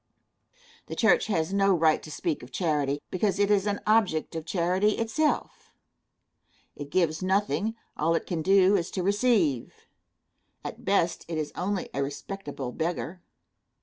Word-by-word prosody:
The - - -5
church 220 - +3
has 170 -3 0
no 195 -1 +4
right 160 -2 +3
to - - -10
speak 310 - -2
of - - -11
charity, 145 -5 0
because 190 0 0
it 205 0 +2
is 205 0 +3
an 205 0 -1
object 200 -8 +2
of 160 0 -5
charity 185 +4 +2
itself. 290 +7 -1 1.0
It 145 -1 -7
gives 160 0 +1
nothing; 205 +3 0 0.2
all 165 +2 +1
it - - -1
can 170 -3 -2
do 195 +2 +5
is 175 -3 0
to 185 - 0
receive. 200 - +1 0.8
At - - -7
best, 185 -4 +1
it 165 -1 -3
is 155 -1 -3
only 195 +1 -2
a 140 - -1
respectable 145 -2 -5
beggar. 170 +3 -3
185 Hz, 150 wpm, -27 LUFS, 160-205 Hz, 1.0 s, do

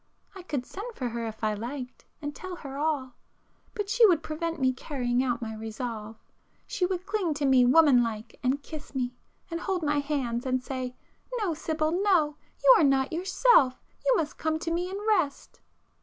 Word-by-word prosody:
—I 380 - -8
could 285 -8 -3
send 435 - -7
for 250 -2 -2
her 230 0 -3
if 220 0 -8
I 215 0 +2
liked, 250 +4 -6 0.2
and 290 0 -3
tell 370 -1 -6
her 275 -5 -8
all,—but 300 - -5
she 475 +4 +3
would 345 -5 +3
prevent 330 +1 -3
me 260 -1 +3
carrying 250 -2 -1
out 245 -2 -1
my 220 -1 -4
resolve. 220 0 -5 0.5
She 360 - 0
would 365 -1 -3
cling 390 -6 -1
to 290 -1 -1
me 260 -2 +5
woman 280 -2 +6
like 225 -1 -4
and 270 +3 0
kiss 305 -3 -9
me, 250 -1 -1 0.4
and 335 - -2
hold 370 -3 -1
my 295 -1 +2
hands 270 -5 -1
and 255 -1 0
say 255 -1 -4 0.4
'No, 405 -7 0
Sibyl, 310 0 -1
no! 350 -5 +2 0.3
You - - +9
are - - +4
not 275 0 +3
yourself,—you 380 - +3
must 305 -2 -3
come 315 0 0
to 330 +1 -3
me 350 +2 -1
and 385 - -4
rest! 350 -10 0
290 Hz, 185 wpm, -28 LUFS, 250-340 Hz, 0.5 s, You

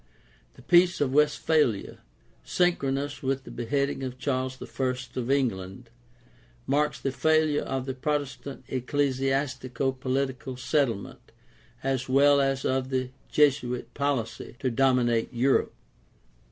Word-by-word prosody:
The - - -16
Peace 175 0 +4
of 135 -3 +1
Westphalia, 150 -6 +2 0.4
syn 180 -1 +2
chronous 140 +1 -2
with 135 0 -1
the - - -10
beheading 140 +3 -1
of 130 -1 -5
Charles 130 0 -2
I 130 -1 -2 0.2
of 120 0 -3
England, 115 -4 -1 0.7
marks 150 +2 +1
the 135 - -2
failure 155 +1 +2
of 135 -1 -3
the 135 - -3
Protestant 140 0 -3
ecclesiastico 135 0 -1
political 130 -1 -2
settlement 125 -6 -1 0.5
as 135 -1 -1
well 140 +1 +5
as 135 0 0
of 130 0 0
the 130 -1 -1 0.2
Jesuit 130 -4 +2
policy 140 -5 -2
to 130 -1 -1
dominate 120 -2 +2
Europe. 130 +2 +1
135 Hz, 120 wpm, -27 LUFS, 130-140 Hz, 0.7 s, well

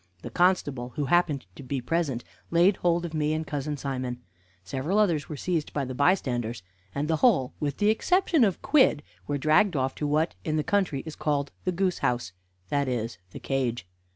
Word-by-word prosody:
The - - -6
constable, 145 -9 +1
who 145 - -1
happened 150 - +2
to - - -10
be 135 +1 -3
present, 135 -2 -1 0.3
laid 175 +4 +4
hold 175 0 +1
of 165 - -6
me 155 -1 +1
and 160 0 -2
cousin 145 0 -3
Simon; 130 -3 -3 0.4
several 135 - -2
others 170 -9 +2
were 150 - -5
seized 165 -1 -2
by 140 -2 -1
the 130 - -5
bystanders; 125 - +1 0.3
and 145 +2 -1
the 160 0 +1
whole, 160 - +3
with 145 -2 -2
the 210 +1 +4
exception 350 - +2
of 195 -5 +1
Quidd, 260 - +4 0.2
were 145 - 0
dragged 155 +6 +3
off 130 -1 0
to 150 - -3
what 155 +3 +1
in 155 - -1
the 155 - +1
country 185 -9 0
is 160 - -7
called 145 -2 -1
the 185 - +2
goose 185 0 0
house 120 -8 -1 0.4
that 140 -1 +1
is, 115 -5 -3
the - - -9
cage. 125 -7 -1
150 Hz, 195 wpm, -27 LUFS, 130-175 Hz, 0.4 s, laid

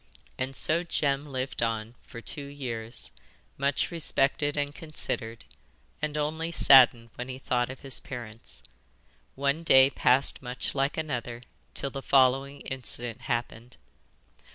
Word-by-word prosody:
And 130 +1 -2
so 160 +5 +3
Jem 145 -4 0
lived 130 -1 -3
on 115 -1 -1
for 115 - -11
two 145 +4 -5
years, 120 -5 -6 0.4
much 140 +4 0
respected 145 -3 +1
and 145 0 -1
considered, 115 -8 -4 0.6
and 150 0 -2
only 160 +3 -2
saddened 120 -7 +6
when 125 +1 -6
he 130 - -5
thought 125 -2 0
of 130 - -8
his 135 -2 -3
parents. 115 -3 -7 0.7
One 140 +3 0
day 135 -4 +6
passed 130 +1 +3
much 125 0 -3
like 140 +1 0
another 125 -6 -4 0.3
till 140 - 0
the 135 - -5
following 135 +1 +3
incident 120 -3 -4
happened. 120 -1 -4
135 Hz, 130 wpm, -28 LUFS, 120-145 Hz, 0.7 s, saddened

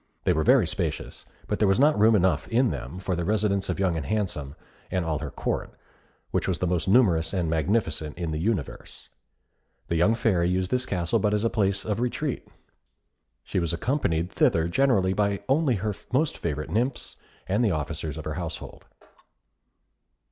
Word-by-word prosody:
They - - +3
were 80 - +1
very - - +5
spacious; - - -4 0.2
but - - -2
there 105 - +4
was 95 +4 +3
not 150 +3 +5
room 110 +1 +6
enough 90 -5 +2
in 120 +1 +2
them 70 +8 -6
for 95 0 -2
the 85 - -2
residence 100 0 0
of - - -2
Young 95 -3 +1
and 80 - -2
Handsome, 85 -10 -2 0.3
and 90 -2 -1
all 80 -2 -1
her 75 -2 -5
Court, - - -3 0.6
which - - 0
was - - 0
the - - -1
most 90 0 0
numerous 95 -7 +3
and 90 -3 0
magnificent 80 -2 0
in 85 -2 -3
the 75 - -2
universe. 90 - -3 0.8
The 85 - 0
young 105 +7 +4
Fairy 90 -7 +1
used 90 0 0
this 125 0 0
castle 85 -3 0
but 105 -1 +1
as 105 - 0
a 115 - +1
place 100 -2 0
of 105 0 -1
retreat. 120 0 -2 1.0
She - - -2
was 85 -1 -1
accompanied 85 - 0
thither 80 0 +2
generally 95 -3 +2
by 100 0 0
only 135 -1 +2
her 105 +1 -2 0.2
most 140 +4 +1
favourite 75 -1 -4
nymphs 120 +6 -1 0.3
and 105 +5 +1
the 110 - +3
officers 75 -2 -3
of 80 - -7
her 80 - -3
household. 85 -3 -6
95 Hz, 185 wpm, -26 LUFS, 80-110 Hz, 1.0 s, room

